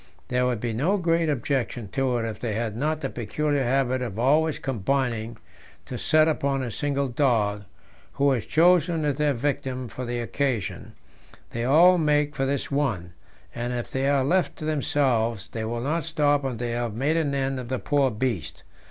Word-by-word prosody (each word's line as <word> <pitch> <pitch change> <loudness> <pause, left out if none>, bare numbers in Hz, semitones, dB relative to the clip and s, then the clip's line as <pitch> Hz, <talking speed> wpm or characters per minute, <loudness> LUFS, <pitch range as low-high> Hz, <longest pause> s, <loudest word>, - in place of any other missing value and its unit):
There 125 0 +1
would 125 -3 -1
be 115 0 -2
no 160 - +1
great 165 -3 +1
objection 125 -4 -1
to 130 0 0
it 115 - -2
if 110 -2 -6
they 115 -3 -2
had 110 -2 -2
not 155 +5 -1
the 135 - -2
peculiar 145 +5 -1
habit 130 0 +1
of 115 -5 -4
always 150 +6 +2
combining 120 -2 -1 0.5
to - - -6
set 155 0 +4
upon 140 -3 0
a 120 - -4
single 140 +3 -1
dog, 115 -6 +1 0.5
who 140 0 +2
is 120 -5 -1
chosen 170 -1 +3
as 145 -2 0
their 150 -2 +1
victim 130 -1 -2
for 125 - -6
the 120 0 -3
occasion; 120 -2 -2 0.6
they 115 0 -2
all 175 +7 +6
make 150 -1 +2
for 135 -2 -1
this 140 0 -2
one, 115 -12 -1 0.4
and 120 +1 -3
if 120 -1 -4
they 135 +1 0
are 140 -2 +3
left 175 +6 +1
to 155 - -7
themselves 130 -8 0
they 110 -1 -3
will 115 +1 -3
not 155 +6 -1
stop 145 -3 +1
until 130 -3 -2
they 120 +1 -3
have 120 -2 -2
made 140 +7 +1
an 150 -4 0
end 135 -1 -1
of 125 - -6
the 130 +1 -1
poor 140 0 +1
beast. 110 - -3
135 Hz, 190 wpm, -25 LUFS, 120-145 Hz, 0.6 s, all